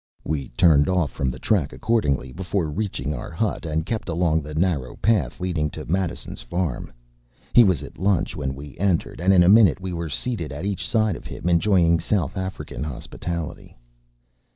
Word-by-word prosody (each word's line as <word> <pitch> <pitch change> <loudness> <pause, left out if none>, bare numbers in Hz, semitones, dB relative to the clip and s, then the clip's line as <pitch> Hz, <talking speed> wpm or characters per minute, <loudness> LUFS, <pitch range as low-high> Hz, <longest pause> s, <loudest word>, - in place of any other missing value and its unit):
” - - -36
We 70 -3 -2
turned 80 -2 +5
off 90 -5 +1
from 65 - -1
the 65 - -5
track 85 - +1
accordingly, 70 - 0
before 90 0 -2
reaching 75 -6 -2
our - - -6
hut, 85 0 -2
and 80 +1 -1
kept 110 -2 -3
along 80 -1 +1
the 75 +1 -8
narrow 80 -7 0
path 95 - +1
leading 85 -5 -1
to - - -6
Madison’s 90 +1 -2
farm. 75 +3 -3 0.6
He 120 - +9
was 95 -5 +2
at - - -11
lunch 95 -4 +1
when 70 -2 -3
we 70 -1 -10
entered; 90 -4 0
and 95 +2 +4
in 90 -2 +6
a - - +4
minute 100 -3 +6
we 95 -1 -4
were 85 -1 -3
seated 85 - -3
at 75 +6 -5
each 100 -2 -2
side 110 -4 +2
of - - -9
him, - - -5
enjoying 85 -1 +4
South 85 -3 -1
African 95 -5 -5
hospitality. 80 +3 -6
85 Hz, 185 wpm, -23 LUFS, 75-95 Hz, 0.6 s, He